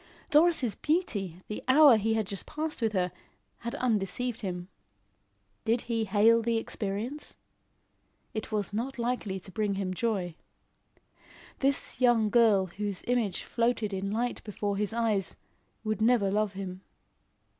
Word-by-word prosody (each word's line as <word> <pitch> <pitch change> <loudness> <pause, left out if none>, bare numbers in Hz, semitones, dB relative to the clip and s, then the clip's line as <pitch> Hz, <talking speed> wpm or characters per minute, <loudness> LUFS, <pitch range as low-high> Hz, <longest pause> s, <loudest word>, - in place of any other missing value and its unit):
Doris' 300 -7 +4
beauty, 200 - -1
the 210 - -5
hour 280 -1 +8
he 220 +1 +1
had 220 -1 0
just 200 -1 -7
passed 310 -2 -3
with 220 -2 +1
her, 180 -2 +1 0.5
had 235 +3 -4
undeceived 245 0 -1
him. 180 -3 -4 1.0
Did 230 +2 +1
he 230 -2 -1
hail 220 +3 +5
the 230 0 +1
experience? 225 +6 -3 1.0
It 220 0 -4
was 205 -2 -2
not 250 +6 -3
likely 235 -5 -2
to 190 +1 -11
bring 210 0 -1
him 190 -1 -2
joy. 190 -4 -1 1.3
This 275 -1 0
young 230 -4 +4
girl 220 -5 +5
whose 200 +1 -5
image 240 -6 0
floated 230 -3 0
in 195 +1 -2
light 235 +4 -2
before 205 -1 -2
his 210 +1 -1
eyes, 225 -4 0 0.5
would 215 0 -2
never 220 -4 +3
love 210 0 +1
him. 190 -1 -6
220 Hz, 140 wpm, -29 LUFS, 195-240 Hz, 1.3 s, hour